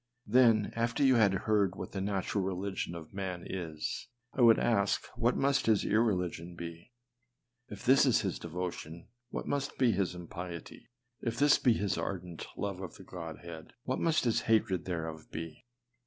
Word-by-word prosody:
Then 115 Hz, -2 st, +4 dB
after 115 Hz, +4 st, +1 dB
you 135 Hz, -1 st, +6 dB
had 105 Hz, -4 st, +5 dB
heard 100 Hz, -4 st, +2 dB
what -, -, -6 dB
the 95 Hz, -, -3 dB
nat 95 Hz, -1 st, -1 dB
ural 100 Hz, -, +1 dB
religion 95 Hz, -1 st, -3 dB
of 80 Hz, +1 st, -9 dB
man 95 Hz, -3 st, -4 dB
is, 80 Hz, -2 st, -4 dB, 0.3 s
I 135 Hz, -, -1 dB
would 115 Hz, -2 st, +8 dB
ask 100 Hz, -4 st, +2 dB
what 120 Hz, +2 st, +2 dB
must 140 Hz, -2 st, +2 dB
his 110 Hz, -3 st, +3 dB
irre 110 Hz, -1 st, +3 dB
ligion 90 Hz, -1 st, -5 dB
be? 85 Hz, +6 st, -8 dB, 0.8 s
If -, -, -9 dB
this 135 Hz, +2 st, +6 dB
is 125 Hz, -, +4 dB
his 95 Hz, -3 st, -2 dB
devotion, 85 Hz, -1 st, -5 dB, 0.2 s
what -, -, -5 dB
must 145 Hz, 0 st, -2 dB
be 125 Hz, -3 st, +4 dB
his 95 Hz, -3 st, 0 dB
impiety? 90 Hz, -1 st, -8 dB, 0.3 s
If 115 Hz, -1 st, -2 dB
this 145 Hz, +2 st, +5 dB
be 125 Hz, -, +4 dB
his 100 Hz, -3 st, -1 dB
ardent 90 Hz, -3 st, -4 dB
love 95 Hz, -1 st, -3 dB
of 95 Hz, -, -7 dB
the -, -, -12 dB
Godhead, 85 Hz, -2 st, -8 dB
what 130 Hz, -, -1 dB
must 165 Hz, -2 st, +2 dB
his 115 Hz, -3 st, +2 dB
hatred 95 Hz, -6 st, +2 dB
thereof 80 Hz, -3 st, -4 dB
be? 80 Hz, +3 st, -7 dB
95 Hz, 175 wpm, -32 LUFS, 85-115 Hz, 0.8 s, would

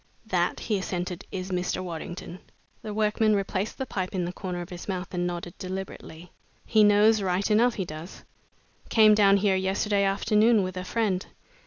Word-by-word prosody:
"That," 180 Hz, -4 st, 0 dB
he 210 Hz, -3 st, -1 dB
assented, 180 Hz, -1 st, -4 dB
"is 190 Hz, 0 st, -5 dB
Mr. 180 Hz, 0 st, -1 dB
Waddington." 175 Hz, +1 st, -7 dB, 0.4 s
The 215 Hz, -, -6 dB
workman 215 Hz, 0 st, +2 dB
replaced 200 Hz, +1 st, -2 dB
the 265 Hz, -, -3 dB
pipe 185 Hz, -5 st, -4 dB
in 180 Hz, -2 st, 0 dB
the 175 Hz, -, -5 dB
corner 180 Hz, -2 st, -5 dB
of 175 Hz, -, -8 dB
his 175 Hz, -1 st, -8 dB
mouth 185 Hz, -2 st, -4 dB
and 175 Hz, 0 st, -1 dB
nodded 175 Hz, -1 st, -5 dB
deliberately. 185 Hz, -2 st, -7 dB, 0.3 s
"He 215 Hz, -1 st, +4 dB
knows 210 Hz, +1 st, +5 dB
right 190 Hz, +2 st, 0 dB
enough, 230 Hz, +3 st, +4 dB
he 190 Hz, -, -2 dB
does. 160 Hz, +2 st, -9 dB, 0.7 s
Came 215 Hz, -2 st, +6 dB
down 200 Hz, -1 st, +5 dB
here 195 Hz, -1 st, +2 dB
yesterday 200 Hz, +2 st, +1 dB
afternoon 210 Hz, +2 st, +3 dB
with 185 Hz, 0 st, -4 dB
a 185 Hz, -, -4 dB
friend. 195 Hz, -2 st, -1 dB
190 Hz, 175 wpm, -26 LUFS, 180-210 Hz, 0.7 s, Came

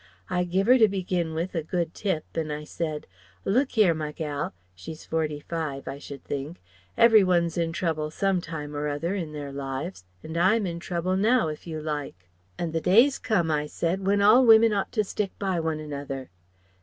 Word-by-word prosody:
I 180 Hz, 0 st, +1 dB
give 185 Hz, +3 st, 0 dB
her 250 Hz, +3 st, +6 dB
to 220 Hz, -, +7 dB
begin 180 Hz, -4 st, -2 dB
with 170 Hz, +3 st, -2 dB
a 165 Hz, -, -1 dB
good 170 Hz, +1 st, -2 dB
tip, 185 Hz, -7 st, -2 dB
an' 160 Hz, -2 st, -2 dB
I 150 Hz, 0 st, -4 dB
said: 155 Hz, 0 st, -4 dB, 0.4 s
'Look 255 Hz, +5 st, +1 dB
'ere, 200 Hz, -6 st, +6 dB
my 155 Hz, -1 st, -4 dB
gal 145 Hz, -, -4 dB, 0.2 s
she's 90 Hz, -, -9 dB
forty 155 Hz, -2 st, -1 dB
five 155 Hz, -5 st, -4 dB
I 135 Hz, +1 st, -5 dB
should 140 Hz, -1 st, -9 dB
think 145 Hz, +5 st, -5 dB, 0.4 s
Every 225 Hz, -3 st, +7 dB
one's 170 Hz, -3 st, +2 dB
in 165 Hz, -1 st, 0 dB
trouble 160 Hz, -3 st, -1 dB
some 190 Hz, +3 st, 0 dB
time 150 Hz, -3 st, -6 dB
or 145 Hz, +1 st, -2 dB
other 150 Hz, +5 st, -2 dB
in 170 Hz, -6 st, -3 dB
their 145 Hz, -2 st, -6 dB
lives, 135 Hz, -, -5 dB, 0.2 s
and 160 Hz, -, -7 dB
I'm 195 Hz, +5 st, +3 dB
in 170 Hz, -2 st, -4 dB
trouble 175 Hz, +1 st, -2 dB
now, 215 Hz, -2 st, +3 dB
if 155 Hz, +3 st, -8 dB
you 160 Hz, -2 st, -4 dB
like. 145 Hz, -, -5 dB, 0.3 s
And 165 Hz, -2 st, -3 dB
the 165 Hz, -, 0 dB
day's 235 Hz, -, +5 dB
come,' 190 Hz, -10 st, +1 dB
I 150 Hz, -1 st, 0 dB
said, 175 Hz, +5 st, -2 dB
'when 200 Hz, 0 st, +3 dB
all 220 Hz, +6 st, +7 dB
women 225 Hz, -2 st, +7 dB
ought 200 Hz, -1 st, -1 dB
to 215 Hz, -, +2 dB
stick 200 Hz, 0 st, -3 dB
by 190 Hz, -3 st, -1 dB
one 160 Hz, -1 st, -1 dB
another.' 140 Hz, -4 st, -6 dB
165 Hz, 200 wpm, -26 LUFS, 150-195 Hz, 0.4 s, to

